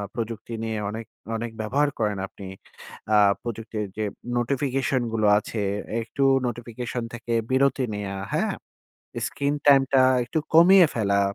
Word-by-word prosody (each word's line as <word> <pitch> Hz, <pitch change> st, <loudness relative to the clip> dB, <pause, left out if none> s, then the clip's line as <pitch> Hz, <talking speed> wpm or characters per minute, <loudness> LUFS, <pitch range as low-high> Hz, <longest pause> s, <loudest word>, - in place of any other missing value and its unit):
প্রযুক্তি 115 Hz, 0 st, -5 dB
নিয়ে 110 Hz, -1 st, -2 dB
অনেক, 110 Hz, +2 st, -6 dB, 0.3 s
অনেক 115 Hz, 0 st, -4 dB
ব্যবহার 140 Hz, +7 st, +1 dB
করেন 105 Hz, -2 st, 0 dB
আপনি। 100 Hz, 0 st, -11 dB, 0.7 s
আ -, -, +6 dB, 0.3 s
প্রযুক্তির 115 Hz, -2 st, -4 dB
যে 110 Hz, -, -1 dB, 0.3 s
নোটিফিকেশন 135 Hz, +1 st, 0 dB
গুলো 110 Hz, -2 st, +2 dB
আছে, 105 Hz, 0 st, -4 dB, 0.4 s
একটু 120 Hz, +4 st, -3 dB, 0.2 s
নোটিফিকেশন 120 Hz, +1 st, -5 dB
থেকে 120 Hz, 0 st, -4 dB, 0.2 s
বিরতি 135 Hz, 0 st, +2 dB
নেয়া, 100 Hz, -1 st, -4 dB, 0.2 s
হ্যাঁ? -, -, 0 dB, 0.7 s
স্ক্রিন 140 Hz, +1 st, -1 dB
টাইমটা 135 Hz, -2 st, +5 dB, 0.2 s
একটু 120 Hz, +7 st, -2 dB, 0.2 s
কমিয়ে 180 Hz, +2 st, +8 dB
ফেলা। 100 Hz, -3 st, +1 dB
120 Hz, 125 wpm, -25 LUFS, 110-135 Hz, 0.7 s, কমিয়ে